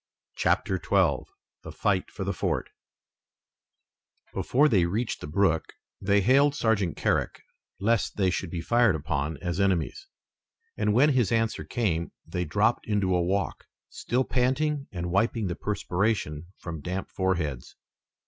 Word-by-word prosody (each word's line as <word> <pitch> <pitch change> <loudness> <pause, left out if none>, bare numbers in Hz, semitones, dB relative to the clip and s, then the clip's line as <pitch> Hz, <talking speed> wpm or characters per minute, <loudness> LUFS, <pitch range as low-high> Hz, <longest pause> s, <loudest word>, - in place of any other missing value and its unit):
CHAPTER - - +1
XII - - +2 0.3
THE - - -8
FIGHT - - 0
FOR - - -6
THE - - -1
FORT - - -2 1.6
Before 145 +4 +3
they 95 - +3
reached 110 +6 -2
the - - -6
brook 80 -2 +1 0.3
they 100 +1 +3
hailed 140 +6 +4
Sergeant 105 - +1
Carrick - - 0 0.4
lest 105 0 +1
they 95 -3 +2
should 95 -1 -3
be 85 0 -4
fired 120 -1 +3
upon 75 0 -2
as 90 +1 -2
enemies, 100 - 0 0.7
and 105 - +1
when 140 +5 +6
his 125 -8 +2
answer 115 -1 0
came 90 -9 -1
they 90 0 -3
dropped 105 +9 +1
into 100 -3 +1
a 90 - +2
walk, 95 +3 -1 0.2
still 125 +3 -1
panting 135 +4 0
and 90 -1 -4
wiping 110 +3 +1
the 90 -2 -2
perspiration 100 -5 -1
from 80 -3 -7
damp 90 +5 -4
foreheads. 85 -9 -2
100 Hz, 140 wpm, -27 LUFS, 85-115 Hz, 1.6 s, when